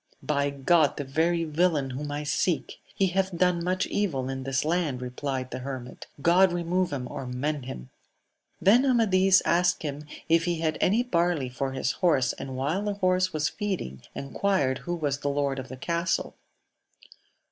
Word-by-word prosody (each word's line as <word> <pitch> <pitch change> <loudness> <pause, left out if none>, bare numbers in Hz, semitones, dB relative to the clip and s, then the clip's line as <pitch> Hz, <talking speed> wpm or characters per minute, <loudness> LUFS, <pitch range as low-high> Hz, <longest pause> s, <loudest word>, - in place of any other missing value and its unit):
By 145 -1 +1
God 140 +2 +2
the 145 - -2
very 165 +5 +1
villain 155 -3 +1
whom 145 +3 -5
I 145 +1 -3
seek! 150 +3 -1
— - - -26
He 195 - +2
hath 190 -1 -1
done 180 -1 +2
much 185 +1 0
evil 140 -11 -1
in 135 0 -4
this 135 +1 0
land, 160 -5 0
replied 130 +1 -4
the 125 - -4
hermit. 130 -1 -7 0.2
God 180 +2 +5
remove 175 +1 0
him 130 -3 -3
or 135 +1 -6
mend 135 +2 -2
him! 65 - -8 0.3
— - - -49 0.3
Then 225 +7 +5
Amadis 195 -7 +4
asked 175 0 +2
him 145 0 -4 0.2
if 165 0 +3
he 175 -1 0
had 160 -1 -1
any 220 +6 +3
barley 170 - 0
for 130 +2 -3
his 130 -1 0
horse; 140 -9 +2
and 130 -1 -7
while 150 +9 0
the 205 -1 -2
horse 185 -1 +2
was 155 -2 0
feeding, 185 - -4
enquired 140 -2 0
who 175 - -3
was 145 -4 -1
the 145 - -1
lord 140 -1 0
of 130 - -7
the 130 - -8
castle. 170 +5 -1
155 Hz, 180 wpm, -27 LUFS, 135-180 Hz, 0.3 s, God